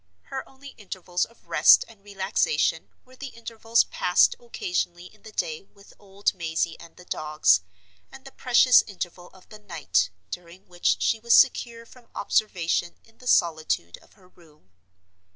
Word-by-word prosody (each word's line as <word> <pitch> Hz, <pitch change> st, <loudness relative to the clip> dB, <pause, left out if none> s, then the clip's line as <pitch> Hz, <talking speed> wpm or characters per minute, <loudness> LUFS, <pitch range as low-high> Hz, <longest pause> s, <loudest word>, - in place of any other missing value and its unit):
Her 270 Hz, -1 st, -7 dB
only 275 Hz, +1 st, -13 dB
intervals 185 Hz, -3 st, -3 dB
of 230 Hz, -, -25 dB
rest -, -, +5 dB
and 215 Hz, -3 st, -19 dB
relaxation 200 Hz, -, -1 dB, 0.2 s
were 255 Hz, 0 st, -18 dB
the 280 Hz, +2 st, -8 dB
intervals 230 Hz, -1 st, 0 dB
passed 180 Hz, +1 st, +2 dB
occasionally 180 Hz, -6 st, -4 dB
in -, -, -17 dB
the 220 Hz, -, -12 dB
day 160 Hz, -6 st, -3 dB
with 200 Hz, +1 st, -21 dB
old 200 Hz, 0 st, -2 dB
Mazey 165 Hz, -2 st, -2 dB
and 170 Hz, -1 st, -15 dB
the 180 Hz, -, -15 dB
dogs, 150 Hz, -, +2 dB, 0.5 s
and 270 Hz, -, -14 dB
the 270 Hz, -, -11 dB
precious 250 Hz, 0 st, +5 dB
interval 175 Hz, -2 st, -7 dB
of 190 Hz, 0 st, -21 dB
the 215 Hz, -, -13 dB
night 175 Hz, -7 st, -1 dB, 0.2 s
during 175 Hz, +1 st, -10 dB
which 175 Hz, -1 st, 0 dB
she 225 Hz, -, +1 dB
was 235 Hz, +1 st, +4 dB
secure 235 Hz, -3 st, +3 dB
from 240 Hz, 0 st, -19 dB
observation 175 Hz, -4 st, 0 dB
in 225 Hz, 0 st, -26 dB
the 250 Hz, -, -12 dB
solitude 160 Hz, -, +1 dB
of -, -, -24 dB
her 190 Hz, -3 st, -23 dB
room. 155 Hz, -, -24 dB
195 Hz, 160 wpm, -25 LUFS, 175-230 Hz, 0.5 s, rest